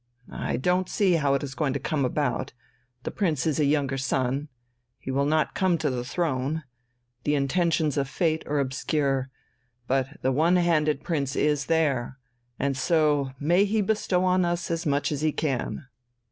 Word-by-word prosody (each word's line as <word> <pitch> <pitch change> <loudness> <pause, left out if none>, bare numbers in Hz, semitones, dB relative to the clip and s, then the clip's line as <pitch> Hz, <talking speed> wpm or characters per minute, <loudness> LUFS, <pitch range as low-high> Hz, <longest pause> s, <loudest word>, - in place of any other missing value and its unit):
I - - -2
don't 180 +7 +1
see 195 -4 +2
how 145 -4 +2
it 140 - -2
is 135 -2 -5
going 140 -1 -1
to 140 - -2
come 140 0 -1
about 135 -1 -1 0.5
the - - -3
Prince 160 -10 0
is 155 -1 0
a 150 - +3
younger 140 -2 +1
son, 135 +2 -1 0.5
he 135 - -6
will 140 +2 +1
not 155 +1 +1
come 185 -3 +2
to 150 -3 -1
the 125 -1 -2
throne, 145 +1 -1 0.6
the 150 - +1
intentions 155 +1 +1
of 135 -1 0
fate 160 +1 0
are 150 - 0
obscure. 135 0 0 0.6
But 135 +3 -1
the 130 - +2
one 160 +7 +3
handed 155 -5 +2
prince 140 -5 -1
is 150 -2 +1
there 140 -6 +1 0.4
and 140 0 0
so 150 -1 +2
may 175 +6 +3
he 210 +2 +1
bestow 190 -3 +1
on 185 0 +3
us 175 0 -1
as 165 0 -2
much 145 +1 +1
as 145 -1 -2
he 155 0 +2
can." 145 0 -2
150 Hz, 175 wpm, -26 LUFS, 135-165 Hz, 0.6 s, a